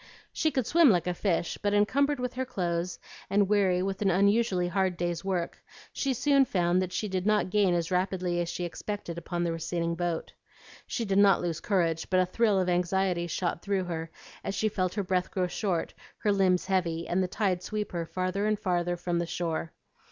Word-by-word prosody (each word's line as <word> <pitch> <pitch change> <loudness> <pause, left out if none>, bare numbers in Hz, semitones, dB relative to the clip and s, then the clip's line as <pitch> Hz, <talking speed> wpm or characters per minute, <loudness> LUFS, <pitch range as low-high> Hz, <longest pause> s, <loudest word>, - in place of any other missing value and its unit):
She 315 - +1
could 260 -6 -1
swim 330 +1 +5
like 175 -6 +3
a 180 - 0
fish, 175 -2 -1
but 205 0 +1
encumbered 280 +7 +2
with 250 0 -2
her 260 - -2
clothes 175 -6 -2 0.3
and 200 0 +3
weary 190 -3 +2
with 195 +1 -3
an 200 - +3
unusually 200 0 +2
hard 185 0 0
day's 175 0 -2
work, 185 -3 -2 0.3
she 275 - -1
soon 275 +2 +4
found 180 -4 +1
that 185 -1 -3
she 210 +4 -2
did 190 0 -2
not 210 -3 +2
gain 195 -4 +3
as 170 0 -1
rapidly 180 -1 0
as 170 - -3
she 175 - -4
expected 175 -1 -5
upon 175 +1 -3
the 170 - 0
receding 170 +1 -2
boat. 170 -1 -3 0.5
She 230 - -2
did 195 -1 +2
not 200 -1 +6
lose 170 -2 -2
courage, 165 -5 0
but 185 - +3
a 185 - +4
thrill 205 +1 +2
of 185 - 0
anxiety 180 0 +1
shot 170 0 -2
through 200 -2 0
her 165 -2 -4 0.3
as 195 - -3
she 215 - +1
felt 185 -3 -1
her 205 - 0
breath 180 -1 0
grow 185 -2 0
short, 180 -1 -2 0.2
her 210 - +1
limbs 190 -2 +2
heavy, 175 -4 0
and 180 +2 +1
the 185 - +1
tide 185 -2 0
sweep 210 +2 -4
her 170 -2 -3
farther 185 +4 -1
and 215 0 +1
farther 175 -3 0
from 175 0 -1
the 170 - -2
shore. 165 -2 -3
185 Hz, 210 wpm, -28 LUFS, 175-205 Hz, 0.5 s, not